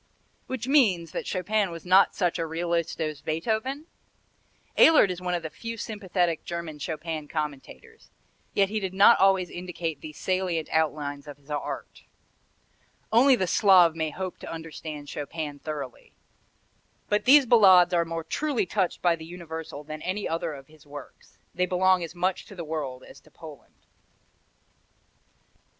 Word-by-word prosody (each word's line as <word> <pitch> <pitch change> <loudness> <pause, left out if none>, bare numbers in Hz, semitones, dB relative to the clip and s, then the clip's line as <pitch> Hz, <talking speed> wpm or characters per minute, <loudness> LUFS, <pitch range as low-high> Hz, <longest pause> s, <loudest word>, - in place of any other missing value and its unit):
Which 260 -2 -4
means 200 - +3
that - - -5
Chopin 200 +2 0
was 165 0 -9
not 185 +2 +5
such 180 -2 0
a 165 - -1
realist 170 +1 -2
as 155 -3 -3
Beethoven? 220 - -2 0.9
Ehlert 300 - +6
is 180 0 -6
one 180 -1 -1
of 170 - -4
the 160 - -5
few 230 0 -7
sympathetic 185 -6 -2
German 170 -3 -6
Chopin 155 0 -4
commentators, 155 - -7 0.5
yet 195 -1 +3
he 215 +1 -1
did 190 -2 -4
not 200 +4 +7
always 190 -2 +3
indicate 175 -3 -5
the 155 - -8
salient 180 0 -2
outlines 150 -2 -1
of 145 -1 -9
his 145 +1 -16
art. 145 - -5 1.1
Only 255 +4 +6
the 190 - 0
Slav 180 -3 +5
may 160 -1 -1
hope 185 +3 -6
to - - -8
understand 155 -2 -7
Chopin 145 0 -5
thoroughly. 145 -5 -7 0.9
But 210 0 0
these 275 +2 +7
Ballades 190 -7 +6
are 170 -1 +3
more 165 0 -5
truly 280 - -1
touched 185 -1 -1
by 175 -1 +4
the 160 - -11
universal 160 -3 -8
than 155 +1 -8
any 195 +3 -2
other 165 -1 -2
of 135 -1 -12
his 155 +1 -20
works. 145 -1 -12 0.2
They 180 +1 0
belong 185 0 +3
as 165 +1 -7
much 180 +1 -1
to 200 - -12
the 170 -3 -6
world 145 -5 -4
as - - -14
to - - -22
Poland. - - -14
170 Hz, 160 wpm, -26 LUFS, 155-190 Hz, 1.1 s, not